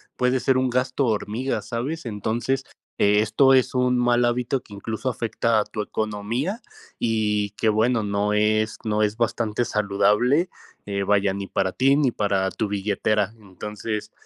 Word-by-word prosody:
puede 125 +1 +1
ser 130 0 +2
un 130 0 +1
gasto 125 +2 0
hormiga, 110 +4 -1
¿sabes? 130 +7 -4
Entonces, 115 +4 -2 0.3
eh, 105 +1 +4
esto 130 +5 +4
es 130 0 +3
un 125 0 +2
mal 120 0 +3
hábito 125 +2 0
que 105 - -15
incluso 110 +5 -3
afecta 115 -1 0
a - - 0
tu 105 0 -5
economía 110 - -3 0.4
y 105 -3 0
que 110 +2 -2
bueno, 110 +2 +2
no 105 0 0
es 110 +1 +1
no 105 0 +1
es 105 +1 0
bastante 115 0 0
saludable, 105 - +2 0.4
eh, 100 -1 -2
vaya, 100 -1 +2
ni 100 0 -5
para 95 -1 -1
ti 135 +2 +3
ni 135 -5 +2
para 100 -3 0
tu 110 - -2
billetera. 105 +1 0
Entonces, 105 +2 -6
110 Hz, 160 wpm, -24 LUFS, 105-125 Hz, 0.4 s, eh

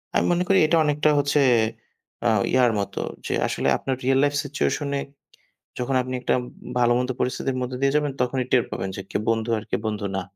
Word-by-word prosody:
আমি - - +3
মনে 175 +1 +2
করি 195 - +4
এটা 165 +1 +3
অনেকটা 150 0 +2
হচ্ছে 145 +1 +2 0.9
আ - - +4 0.2
ইয়ার 125 -2 +4
মতো। 100 - -3 0.2
যে - - -2
আসলে - - -2
আপনার 135 - -2
রিয়াল 135 +1 +3
লাইফ 145 0 +2
সিচুয়েশন 145 0 -1
এ - - -2 0.8
যখন 130 +2 -1
আপনি 130 0 -5
একটা - - +1 0.5
ভালো-মন্দ 120 +1 +2
পরিস্থিতির 130 +1 -1
মধ্য 125 0 -3
দিয়ে 140 0 +2
যাবেন। 150 -1 +1
তখনই 125 0 0
টের 125 -2 +4
পাবেন 95 - -3
যে 100 - -5
কে - - 0
বন্ধু 115 0 0
আর 105 - -5
কে - - 0
বন্ধু 105 -1 -2
না। 95 - -1
130 Hz, 195 wpm, -24 LUFS, 120-145 Hz, 0.9 s, করি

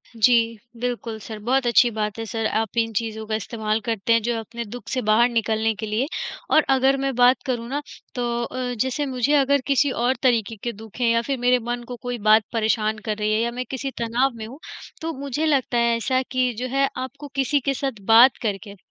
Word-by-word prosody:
जी, 230 0 +3 0.2
बिल्कुल 240 -2 -3
सर 215 0 -8
बहुत 265 +1 +2
अच्छी 240 +1 +5
बात 210 -1 -3
है 225 - -3
सर, 225 0 -3
आप 220 0 -1
इन 225 -1 +1
चीज़ों 220 0 -3
का 215 - -1
इस्तेमाल 220 0 -2
करते 225 0 +1
हैं 230 - +3
जो 240 - 0
है 230 - -2
अपने 235 +2 -7
दुःख 230 +1 -9
से 260 - -1
बाहर 235 +3 +5
निकलने 225 -1 0
के - - -2
लिए। 215 +6 -1 0.4
और 310 - +6
अगर 265 +1 +3
मैं 270 0 0
बात 245 +1 +4
करूँ 240 -3 -2
ना 285 +2 -2 0.3
तो 250 - -2 0.2
अ, 250 0 -3
जैसे 260 +5 -1
मुझे 260 +1 0
अगर 280 -1 +3
किसी 280 0 +3
और 255 +2 +2
तरीके 230 -3 +2
के 240 - -1
दुःख 220 +3 -12
हैं 235 - +3
या 230 - +3
फिर 270 - 0
मेरे 250 +1 +3
मन 240 0 -2
को 245 - -6
कोई 245 -1 -2
बात 215 0 +7
परेशान 220 -1 +1
कर 215 -1 -2
रही 210 0 0
है 215 - +2
या 235 +1 0
मैं 250 +1 -4
किसी 270 +1 -4
तनाव 240 +4 +1
में 220 - -7
हूँ, 265 +6 -11 0.4
तो 325 0 -3
मुझे 280 +2 -2
लगता 275 -5 +1
है 235 0 +3
ऐसा 255 +3 0
कि 255 -1 +1
जो 255 - -2
है 275 +2 +2
आपको 265 +3 -6
किसी 275 +2 +2
के 275 +1 -1
साथ 265 -6 -4
बात 245 +3 +8
करके 205 -2 -3
240 Hz, 230 wpm, -23 LUFS, 225-260 Hz, 0.4 s, बात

